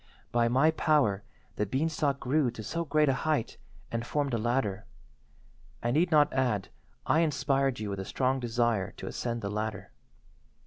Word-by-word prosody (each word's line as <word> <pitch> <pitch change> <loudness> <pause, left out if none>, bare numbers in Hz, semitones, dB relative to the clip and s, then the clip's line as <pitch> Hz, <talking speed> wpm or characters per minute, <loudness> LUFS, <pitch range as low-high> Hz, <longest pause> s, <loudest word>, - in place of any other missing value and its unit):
"By 120 -1 +3
my 135 +7 +4
power 145 - +2 0.4
the 105 - 0
beanstalk 140 +2 0
grew 140 +1 +1
to 115 -2 -8
so 170 +10 -2
great 155 -1 +2
a 135 - +4
height 155 -7 0 0.3
and 115 0 -2
formed 140 +2 -1
a 115 - +1
ladder. 110 -4 -1 1.0
I 120 - +1
need 165 +7 +3
not 150 -2 +4
add 125 -7 0 0.4
I 160 - +3
inspired 140 -5 +1
you 105 -2 -3
with 100 - -4
a 95 - -4
strong 130 +4 0
desire 120 -4 0
to - - -9
ascend 120 -2 -3
the 100 - -2
ladder. 105 -1 -4
125 Hz, 170 wpm, -29 LUFS, 110-145 Hz, 1.0 s, my